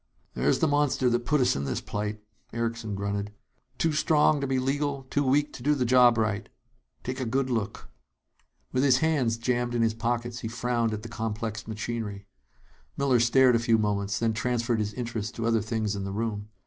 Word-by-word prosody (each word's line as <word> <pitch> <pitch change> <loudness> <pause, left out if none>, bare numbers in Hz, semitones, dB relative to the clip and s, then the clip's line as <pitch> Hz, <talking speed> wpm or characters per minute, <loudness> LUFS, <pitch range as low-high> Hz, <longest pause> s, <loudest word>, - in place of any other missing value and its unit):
"There's - - +2
the 160 - +2
monster 145 -3 +2
that 120 0 -1
put 150 -1 +3
us 125 - +3
in 70 - -2
this - - -2
plight," 105 +1 -4 0.3
Erickson 115 -2 -3
grunted. 100 +1 -3 0.4
"Too 165 - +1
strong 150 -1 +3
to 140 - -1
be 135 0 0
legal, 140 +1 -1
too 145 - +2
weak 145 +2 +2
to - - -9
do 150 +4 +2
the 130 -3 0
job 125 -1 +6
right. 110 -1 -1 0.5
Take 130 +2 -4
a - - -1
good 130 +3 0
look!" 110 -4 -3 0.8
With 130 - +1
his 130 -3 +5
hands 135 -7 +1
jammed 120 0 -1
in 115 - +2
his 110 -1 +2
pockets, 120 +1 -2
he 110 - -4
frowned 120 0 -1
at 105 0 -4
the - - -6
complex 110 -1 -4
machinery. 110 -2 -4 0.7
Miller 135 -3 +3
stared 125 +2 +5
a - - +3
few 115 -1 +3
moments; 100 -1 0
then 115 -1 +1
transferred 120 0 0
his 105 0 -2
interests 115 -4 -3
to 115 - -4
other 115 -1 +2
things 110 -1 -2
in 100 - -4
the 100 - -4
room. 105 0 -3
115 Hz, 200 wpm, -27 LUFS, 110-130 Hz, 0.8 s, job